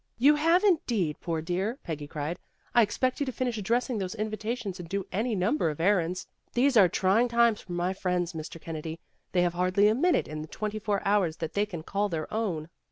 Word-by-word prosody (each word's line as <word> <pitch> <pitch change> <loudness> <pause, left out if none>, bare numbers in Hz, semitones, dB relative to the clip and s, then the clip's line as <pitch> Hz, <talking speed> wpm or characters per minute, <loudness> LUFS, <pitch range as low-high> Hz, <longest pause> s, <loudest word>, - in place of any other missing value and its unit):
"You 275 +6 +6
have 330 +5 +3
indeed, 235 - +1
poor 165 -2 -2
dear," 190 +8 -1
Peggy 150 -3 -5
cried. 150 +4 -4 0.3
"I 240 - +6
expect 235 +4 0
you 285 - +1
to - - -1
finish 245 -3 -2
addressing 235 +3 0
those 190 +2 -3
invita 215 +1 -2
tions 200 -7 -6
and 170 -2 -8
do 195 0 -2
any 220 +4 0
number 195 - +1
of 150 - -5
errands. 185 0 +1 0.3
These 260 +2 +3
are 195 -5 +7
trying 195 +8 +3
times 235 -2 +3
for 180 - -8
my 175 +2 0
friends, 180 -2 -1
Mr. 160 +1 -7
Kennedy. 160 0 -6 0.3
They 180 -1 +3
have 175 -1 +1
hardly 185 +3 +3
a 215 - +4
minute 345 +9 +2
in 155 0 -5
the 155 - -7
twenty 215 +5 -4
four 205 -2 -1
hours 195 -6 +2
that 160 - -4
they 205 +1 +1
can 170 -6 -6
call 205 +4 -1
their 160 -3 -4
own." 185 -9 -1
200 Hz, 220 wpm, -28 LUFS, 170-230 Hz, 0.3 s, are